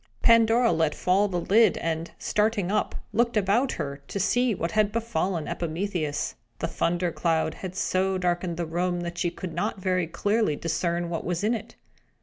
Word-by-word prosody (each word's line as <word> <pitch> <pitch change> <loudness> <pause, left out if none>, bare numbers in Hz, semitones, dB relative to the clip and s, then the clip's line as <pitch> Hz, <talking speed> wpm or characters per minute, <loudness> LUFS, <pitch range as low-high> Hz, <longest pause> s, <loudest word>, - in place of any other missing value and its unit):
Pandora 230 +1 +5
let 160 -2 +1
fall 195 +3 +2
the 180 -3 -2
lid, 220 +6 +4
and, 165 0 -2
starting 210 -3 0
up, 210 - 0 0.2
looked 235 0 +2
about 210 +7 +2
her, 140 -3 -4
to 200 - -4
see 245 +4 +2
what 170 -1 -2
had 210 +1 +2
befallen 190 -7 -1
Epimetheus. 170 -2 -2 0.2
The - - -2
thunder 175 +1 0
cloud 165 -1 0
had 185 -1 -7
so 190 0 +1
darkened 175 -1 -1
the 170 - -1
room 175 +2 -1
that 175 0 -5
she 175 - +1
could 170 0 -7
not 195 +4 -2
very 185 -2 0
clearly 205 0 +1
discern 170 +2 -1
what 165 - -2
was 175 +1 -2
in 220 +3 +2
it. 225 -3 -6
180 Hz, 175 wpm, -26 LUFS, 170-210 Hz, 0.2 s, Pandora